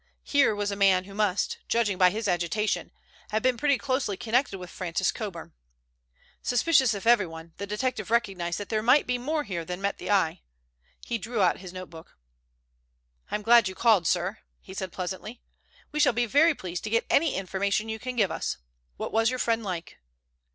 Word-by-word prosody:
Here 280 -7 +3
was 205 0 -1
a - - -2
man 195 -2 +4
who 195 +1 -12
must, 205 -2 0
judging 215 -5 +1
by 180 -1 +7
his 215 +3 -3
agitation, 180 +4 -1 0.4
have 215 +1 -1
been 255 -1 +3
pretty 280 +3 +2
closely 255 -8 -1
connected 235 -2 0
with 180 -1 -9
Francis 180 0 -1
Coburn. 195 -7 -7 0.9
Suspicious 260 -2 +3
of 200 - -7
everyone, 170 -8 +1
the 200 - -5
detective 215 0 -2
recognized 190 -7 0
that 205 - -6
there 215 -1 0
might 250 +6 +4
be 250 0 -1
more 300 +4 -1
here 175 -9 -4
than 180 +2 -5
met 200 +1 -2
the - - -6
eye. 195 -6 +2 0.6
He 235 -1 -2
drew 225 +2 -4
out 180 - +2
his 185 -1 -9
notebook. 175 -3 -11 1.1
"I - - -2
am 210 - -3
glad 230 -1 +6
you 190 - -5
called, 210 -8 +3
sir," 185 +4 0 0.2
he 190 - -12
said 190 -1 -4
pleasantly. 190 +6 -6 0.5
"We 300 - -3
shall 290 - +4
be 240 +1 +1
very 295 +7 +4
pleased 180 -5 -6
to - - -3
get 230 +1 +1
any 315 0 +2
information 200 +3 -1
you 220 0 -4
can 255 +1 -5
give 205 -7 +2
us. - - -3 0.4
What - - -4
was 225 +1 +3
your 255 - -2
friend 230 -2 0
like?" 180 -4 -5
210 Hz, 195 wpm, -27 LUFS, 185-235 Hz, 1.1 s, by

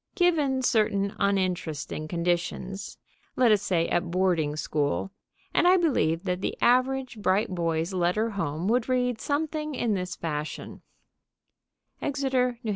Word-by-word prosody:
Given 305 -8 +2
certain 200 -4 +1
uninteresting 180 -6 -1
conditions, 175 +3 -2 0.4
let 245 -3 +4
us 210 -2 +4
say, 175 -4 +1
at 175 0 0
boarding 170 -5 +1
school, 150 +4 -1 0.4
and 350 - +4
I 370 +1 +6
believe 200 - +1
that 180 -1 -2
the - - -2
average 255 -1 +2
bright 200 +2 +2
boy's 165 0 -1
letter 185 +5 +1
home 165 -3 -2
would 240 +1 +1
read 250 -2 0
something 305 0 -2
in 230 -4 0
this 180 -2 -3
fashion: 150 -2 -5 1.2
_Exeter, 260 -3 0
N.H. - - -1
200 Hz, 130 wpm, -27 LUFS, 175-255 Hz, 1.2 s, I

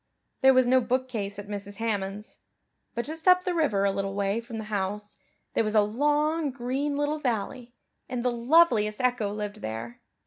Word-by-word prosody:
There 265 0 +6
was 255 -1 +5
no 255 +1 +4
bookcase 240 -5 -2
at 205 0 -7
Mrs. 205 0 -5
Hammond's. 205 -2 -3 0.6
But 235 - -2
just 320 +3 -6
up 365 0 +6
the 365 - -1
river 275 - +1
a 200 - +3
little 195 0 -3
way 200 +2 0
from 230 -1 -8
the 220 - -4
house 210 0 -3 0.4
there - - +2
was 215 0 -1
a 210 - +6
long 295 +7 +1
green 270 +3 -2
little 290 +1 0
valley, 245 -1 -3 0.3
and 250 -1 -3
the 250 - +3
loveliest 235 -4 +3
echo 245 -5 +1
lived 210 0 -5
there. 115 +2 -6
235 Hz, 180 wpm, -27 LUFS, 205-265 Hz, 0.6 s, There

